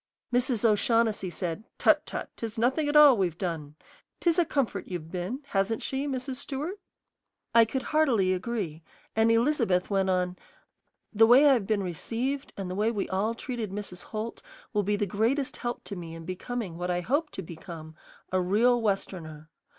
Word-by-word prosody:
Mrs. 245 -2 +1
O'Shaughnessy 220 -2 +2
said, 175 +3 -4
"Tut, - - +4
tut, - - -5
'tis 225 0 -5
nothing 265 +6 +2
at 295 - -1
all 295 -3 +9
we've 180 -6 0
done. 160 -6 -4 0.4
'Tis 340 0 +2
a 345 - +4
comfort 240 - -1
you've 165 -3 -6
been, 185 +9 -3
hasn't 195 +3 0
she, 270 +2 -2
Mrs. 260 -1 -3
Stewart?" 295 +8 -4 0.7
I 230 -1 +7
could 260 +4 -3
heartily 245 -12 +2
agree; 185 -5 -3 0.3
and 220 +1 +4
Elizabeth 230 -7 +2
went 195 -1 +2
on, 180 -1 0 0.8
"The 220 +1 +6
way 260 +5 +7
I 280 - +7
have 225 -7 0
been 210 -3 +1
received 235 - -3
and 195 -2 -4
the 180 - -4
way 210 +4 +1
we 210 -4 -2
all 205 +5 0
treated 235 -3 -4
Mrs. 195 -2 -6
Holt 220 +1 -5 0.3
will 210 - +2
be 205 +1 0
the 205 - 0
greatest 230 +8 0
help 240 0 -4
to 200 - -6
me 165 -2 -7
in 165 0 -9
becoming 185 0 -4
what 180 0 -2
I 175 0 0
hope 290 - 0
to 190 - -5
become, 160 -1 -9 0.4
a 185 0 +2
real 230 +7 +3
Westerner. 165 -7 -3
215 Hz, 180 wpm, -28 LUFS, 180-245 Hz, 0.8 s, all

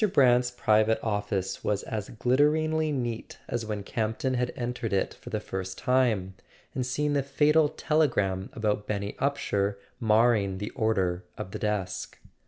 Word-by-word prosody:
Brant's 125 -2 +5
private 110 -2 +3
office 105 -3 -2
was 105 -1 0
as 105 -3 -4
glitteringly 155 +6 +2
neat 120 -5 -3
as 115 -2 -3
when 105 -2 -3
Campton 110 +5 -1
had 125 0 0
entered 120 -3 -3
it 95 - +1
for - - -12
the - - -1
first 95 -1 -5
time, 120 -8 +1 0.4
and 130 - -1
seen 145 +4 0
the 140 - +2
fatal 150 +3 +3
telegram 105 -15 +1
about 105 -2 -1
Benny 100 -1 -2
Upsher 100 -8 0 0.2
marring 110 -3 +3
the 105 +2 -4
order 95 -4 0
of 95 - -6
the 105 - -5
desk. 100 -3 -2
110 Hz, 150 wpm, -28 LUFS, 100-130 Hz, 0.4 s, Brant's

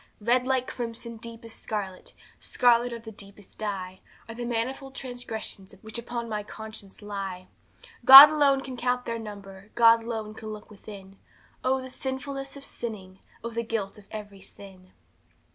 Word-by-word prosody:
"Red 245 +4 +2
like 260 -1 +1
crimson, 230 -1 -6
deep 230 0 -8
as 225 - -10
scarlet, 195 -4 -6 0.2
Scarlet 245 0 +3
of 230 -1 -7
the 220 - -9
deepest 200 -1 -13
dye, 190 -3 -4 0.3
Are 230 - -7
the 240 +1 -5
manifold 260 +3 -3
transgressions 225 -6 -6
Which 220 +2 -5
upon 235 0 -5
my 210 -2 -3
conscience 215 -1 -10
lie! 195 -3 -6 0.5
"God 275 +3 +13
alone 280 -3 +3
can 260 -2 -7
count 250 +1 -1
their 230 0 -3
number! 200 -2 -10
God 230 -1 +6
alone 220 -2 -5
can 220 0 -8
look 210 0 -10
within; 195 -2 -12 0.4
Oh, 265 +1 +2
the 260 - -9
sinfulness 270 +1 -5
of 275 - -11
sinning! 195 -5 -7 0.2
Oh, 235 - -4
the 230 0 -2
guilt 220 -3 -4
of 200 - -19
every 205 -2 -9
sin!" 185 -2 -13
225 Hz, 160 wpm, -27 LUFS, 205-245 Hz, 0.5 s, God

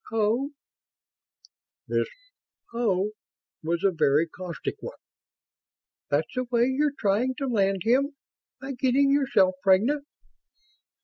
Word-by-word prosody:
"Oh." 225 +5 +1 1.4
This - - 0 0.7
"oh" 210 -4 +1 0.5
was 170 +3 -2
a 195 - +4
very 155 -2 +3
caustic 180 -1 -6
one. - - -8 1.1
"That's 150 +2 0
the 255 0 -1
way 240 -1 +2
you're 280 +3 +1
trying 225 +6 +1
to 275 - -3
land 195 -6 +1
him? 275 +5 +2 0.4
By 270 0 -6
getting 265 +2 +2
yourself 270 -10 +3
pregnant?" 225 +10 +3
230 Hz, 110 wpm, -26 LUFS, 190-270 Hz, 1.4 s, a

